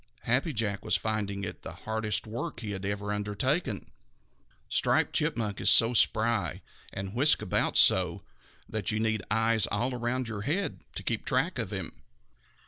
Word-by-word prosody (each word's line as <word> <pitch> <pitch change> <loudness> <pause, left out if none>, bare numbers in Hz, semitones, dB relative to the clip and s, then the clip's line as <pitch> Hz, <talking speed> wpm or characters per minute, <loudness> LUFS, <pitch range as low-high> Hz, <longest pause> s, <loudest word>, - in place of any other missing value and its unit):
Happy 130 +8 +1
Jack 105 -5 -2
was - - +1
finding 100 -2 -2
it 95 - -6
the - - -7
hardest 110 -1 -1
work 115 +1 -5
he 105 -3 -4
had 95 -1 -5
ever 100 0 -2
undertaken. 105 - -1 0.8
Striped - - +2
Chipmunk 105 -4 -1
is - - +3
so 115 +2 +6
spry, 110 -5 +1 0.3
and 95 0 -5
whisks 145 +5 +4
about - - +1
so, - - +5 0.4
that 110 -3 -2
you 105 - -1
need 110 -1 0
eyes 115 0 +2
all 120 +6 -1
around 125 +1 -2
your 110 -3 -5
head 160 - -1 0.2
to - - -5
keep 115 -2 -1
track 130 +4 0
of 110 -5 -2
him. 95 -5 -5
110 Hz, 160 wpm, -29 LUFS, 105-120 Hz, 0.8 s, so